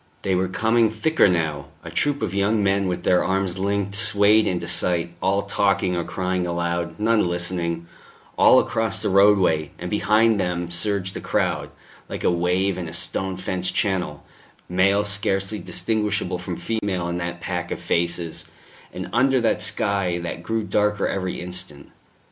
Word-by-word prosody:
They 95 - 0
were 90 +1 +1
coming 110 +4 +2
thicker 135 +6 +2
now; 80 -5 -1 0.2
a - - -8
troop 145 -4 0
of 100 -4 -2
young 100 +2 +1
men 100 0 +2
with 90 -1 -3
their 90 - +3
arms 95 -1 -1
linked 100 0 -1
swayed 100 +2 +3
into 85 -1 -2
sight, 85 -1 0
all 100 +1 +1
talking 100 -2 +1
or 85 - -1
crying 90 0 -2
aloud, 85 0 -2
none 110 0 +3
listening 85 -1 -1 0.5
all - - +6
across 110 -3 0
the 105 - -1
roadway, 95 -6 +4
and 90 0 -6
behind 105 +1 +3
them 90 -2 -2
surged 95 +1 0
the - - -6
crowd, - - -1 0.4
like - - -5
a - - +3
wave 90 +2 0
in 85 - -4
a - - -6
stone 95 -1 -1
fenced 95 0 -2
channel, 90 -7 -1 0.4
male 100 +3 +3
scarcely 100 0 -1
distinguishable 105 +1 -1
from 90 -1 -5
female 100 -6 -2
in 85 0 -3
that 85 0 -4
pack 85 -1 -4
of - - -4
faces, 85 -1 -1 0.5
and - - -6
under 130 +2 +3
that 115 - +1
sky 100 -4 0
that 85 0 -5
grew 110 +4 -2
darker 105 0 +1
every 95 -2 -3
instant. 90 -5 -7
95 Hz, 165 wpm, -23 LUFS, 85-105 Hz, 0.5 s, all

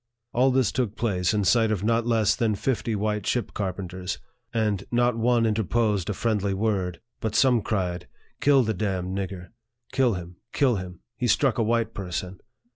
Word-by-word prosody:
All 130 +3 +4
this 130 -4 +2
took 120 -5 -1
place 90 -6 0
in 105 -1 +1
sight 115 +3 +4
of 105 -3 -1
not 115 +1 +1
less 110 -3 +3
than 110 -3 +1
fifty 115 0 -1
white 105 -1 -1
ship 120 - -1
carpenters, 95 -2 -4 0.3
and 105 -4 0
not 120 0 +2
one 115 0 +2
interposed 105 -2 +1
a - - 0
friendly 105 -3 0
word; 95 -4 -1 0.2
but 110 -1 -3
some 125 -3 +4
cried, 90 -5 -2 0.2
" - - -38
Kill 140 -2 +5
the 110 -1 0
damned 95 -2 -2
nigger! 95 -2 -5 0.4
Kill 130 -4 +2
him! 90 0 -8 0.2
kill 130 -6 +3
him! 90 -1 -7 0.2
He 125 - 0
struck 130 0 +2
a - - +3
white 115 0 0
person." 90 0 -5
110 Hz, 180 wpm, -25 LUFS, 95-115 Hz, 0.4 s, Kill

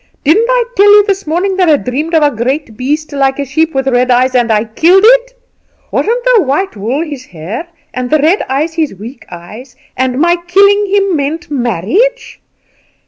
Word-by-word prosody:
Didn't 390 +11 +3
I - - +2
tell 405 +1 +4
you 415 0 +6
this 395 -3 -2
morning 370 +5 -1
that 365 -3 +2
I 300 - +4
dreamed 295 +7 -3
of 315 - +3
a 290 -4 +1
great 250 +1 -3
beast 295 +6 -3
like 270 -1 0
a 285 - -3
sheep, 315 +3 -1
with 270 0 -1
red 250 -1 +1
eyes, 255 +1 +2
and 240 -2 +1
I 210 -1 +2
killed 335 - +2
it? - - +3 0.6
Wasn't 475 +3 -1
the 450 - +4
white 290 +3 -2
wool 235 +10 -2
his 285 -5 -8
hair, 185 - -7 0.3
and 250 -1 -4
the 310 - +3
red 320 +7 +1
eyes 295 +5 -1
his 315 -9 -2
weak 225 +4 -11
eyes, 210 +10 -11 0.2
and 255 0 -1
my 345 +2 +2
killing 400 +3 +3
him 395 -2 +1
meant 300 +3 -4
marriage? 280 - -1
295 Hz, 195 wpm, -12 LUFS, 250-380 Hz, 0.6 s, you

